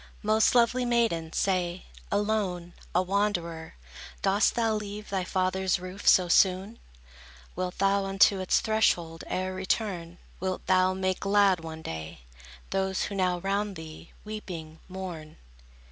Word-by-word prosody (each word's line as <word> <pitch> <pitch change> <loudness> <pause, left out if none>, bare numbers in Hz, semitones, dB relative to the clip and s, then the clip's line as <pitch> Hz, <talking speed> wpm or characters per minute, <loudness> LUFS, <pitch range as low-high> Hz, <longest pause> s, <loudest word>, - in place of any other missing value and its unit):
Most 215 +3 +3
lovely 245 +1 +4
maiden, 230 -10 +1
say! 185 -1 -1 0.3
Alone, 200 -4 -1 0.2
a 180 - +4
wanderer, 175 -4 -2 0.5
dost 200 +2 +3
thou 225 -2 +1
leave 210 0 -5
Thy 190 -2 0
father's 185 0 0
roof 185 +2 -8
so 180 -1 +6
soon? 190 +5 +3 0.8
Wilt 180 0 -3
thou 195 +1 +2
unto 195 0 +4
its 185 - +2
threshold 175 -7 +1
e'er 185 0 -2
return? 185 -3 -2 0.2
Wilt 185 0 -3
thou 185 0 +3
make 185 0 -1
glad 200 -2 +3
one 160 -1 -8
day, 80 - -7 0.5
Those, 190 -1 0
who - - -4
now 185 -2 +1
round 200 +1 -1
thee, 160 0 -10
weeping, 175 -7 -7
mourn? 180 -5 -7
190 Hz, 130 wpm, -28 LUFS, 175-205 Hz, 0.8 s, so